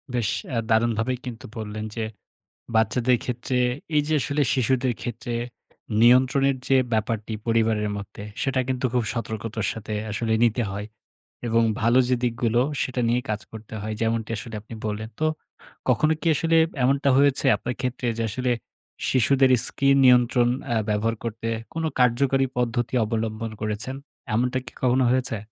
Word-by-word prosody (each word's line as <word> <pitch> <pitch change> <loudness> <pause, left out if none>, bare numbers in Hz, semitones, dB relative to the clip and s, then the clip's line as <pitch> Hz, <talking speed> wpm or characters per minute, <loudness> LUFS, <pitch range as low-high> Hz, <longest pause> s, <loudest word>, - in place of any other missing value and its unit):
বেশ 115 -4 +1 0.2
অ্যা 125 -4 -1
দারুণভাবেই 115 +2 +2
কিন্তু 125 +1 -7
বললেন 110 0 -5
যে, 115 - -2 0.7
বাচ্চাদের 115 +3 +3
ক্ষেত্রে 125 +1 -2 0.4
এই 150 - +5
যে 155 - 0
আসলে 145 +3 0
শিশুদের 130 -1 +1
ক্ষেত্রে 120 +1 -5 0.7
নিয়ন্ত্রণের 130 +3 +5
যে 135 - +5 0.2
ব্যাপারটি 110 0 -1
পরিবারের 110 -2 +2
মধ্যে, 100 0 -8 0.2
সেটা 135 -1 0
কিন্তু 130 0 -1
খুব 125 -1 +2
সতর্কতার 110 -2 -3
সাথে 110 -1 -6 0.2
আসলে 110 +2 -1
নিতে 120 +1 +2
হয়। 100 +2 -5 0.6
এবং 115 0 +3 0.2
ভালো 120 +3 +4
যে 130 - +4
দিকগুলো 120 0 +1 0.2
সেটা 125 -1 -1
নিয়েই 120 +2 +1
কাজ 105 0 -1
করতে 110 0 -10
হয়, 110 +1 -3
যেমনটি 115 0 0
আসলে 110 +1 -7
আপনি 110 - -12
বললেন। 110 +1 -3
তো 155 - +1 0.6
কখনো 155 +1 +3
কি - - -1
আসলে 165 +2 +2 0.3
এমনটা 140 +2 +3
হয়েছে 140 0 +3
আপনার 125 0 -4
ক্ষেত্রে? 125 -1 -2
যে 115 - -1
আসলে 125 +4 -1 0.6
শিশুদের 130 +1 +4 0.2
স্ক্রিন 140 0 +2
নিয়ন্ত্রণ 125 -1 +5 0.2
অ্যা 120 -3 +1
ব্যবহার 105 +2 +1
করতে 115 0 -4 0.3
কোন 165 - -3 0.2
কার্যকারী 135 +2 +3
পদ্ধতি 120 0 -1
অবলম্বন 110 0 -3
করেছেন? 110 +4 -3 0.4
এমনটা 125 +3 +1
কি 130 - -8
কখনো 130 +1 +3
হয়েছে? 130 -3 0
120 Hz, 150 wpm, -24 LUFS, 110-130 Hz, 0.7 s, এই